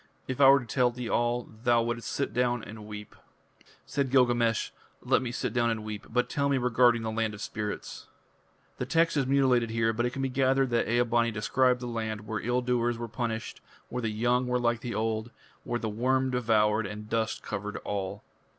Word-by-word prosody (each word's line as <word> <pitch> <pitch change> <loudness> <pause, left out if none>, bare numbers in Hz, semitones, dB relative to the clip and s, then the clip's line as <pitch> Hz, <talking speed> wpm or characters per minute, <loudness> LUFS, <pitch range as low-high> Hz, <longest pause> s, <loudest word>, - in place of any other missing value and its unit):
If 130 +1 -2
I 135 - +9
were 140 +1 +7
to - - -9
tell 125 +2 +2
thee 120 0 -6
all, 120 +1 0 0.2
thou 120 -1 +4
wouldst 120 0 -3
sit 140 - -2
down 120 -2 +1
and 105 +1 -9
weep." 105 -1 -9 0.7
Said 140 -2 -1
Gilgamesh: 120 -3 +2 0.3
"Let - - +3
me 125 -2 -3
sit 125 -2 -3
down 120 -1 +2
and 110 -2 -2
weep, 105 -1 -6
but 125 +1 +1
tell 140 -1 0
me 140 - +2
regarding 120 -1 +3
the 110 - -2
land 110 -1 -1
of 105 - -10
spirits." 105 -2 -5 0.7
The 125 - -2
text 165 +2 +2
is 135 -3 +1
mutilated 130 -4 +3
here, 115 0 +1
but 120 +2 0
it - - -1
can 135 +2 -4
be 135 - 0
gathered 135 0 +2
that 120 -2 +1
Ea 120 +1 +3
bani 115 0 +2
described 125 +4 +1
the - - -4
land 110 -3 -3
where 110 0 -3
ill 125 +2 0
doers 120 -1 +1
were 120 0 -4
punished, 115 -1 -4 0.3
where 125 - -3
the 115 - -1
young 120 +4 +1
were 125 0 +1
like 120 -1 +1
the 120 -3 -4
old, 110 +1 -1 0.3
where 120 - -2
the 115 - -3
worm 130 +4 +1
devoured, 110 -3 +2
and 105 +1 -7
dust 110 0 -1
covered 105 0 -4
all. 100 -2 -3
120 Hz, 210 wpm, -28 LUFS, 110-125 Hz, 0.7 s, I